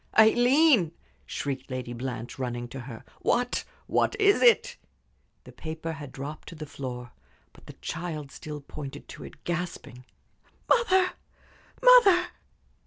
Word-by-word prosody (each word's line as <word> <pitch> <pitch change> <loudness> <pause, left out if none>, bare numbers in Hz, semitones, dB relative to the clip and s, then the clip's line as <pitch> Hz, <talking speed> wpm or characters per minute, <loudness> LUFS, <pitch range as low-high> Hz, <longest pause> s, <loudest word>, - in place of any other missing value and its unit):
"Aileen!" 240 - +5 0.3
shrieked 135 -2 -4
Lady 130 -2 -4
Blanche, 120 0 -5
running 120 -1 -3
to 135 - -7
her. 120 -3 -9 0.2
"What 245 0 +1 0.2
what - - +1
is 405 -1 +5
it?" 485 0 +5 0.7
The - - -13
paper 160 0 -6
had 145 -4 -8
dropped 145 +4 -7
to - - -10
the 155 -1 -7
floor, 125 -5 -7 0.4
but - - -19
the - - -9
child 155 -4 -4
still 150 -1 -7
pointed 140 0 -8
to - - -9
it, 155 - -12
gasping. 170 -8 -5 0.6
"Mother 380 -6 +4 0.7
mother!" 410 -8 +7
155 Hz, 130 wpm, -27 LUFS, -, 0.7 s, mother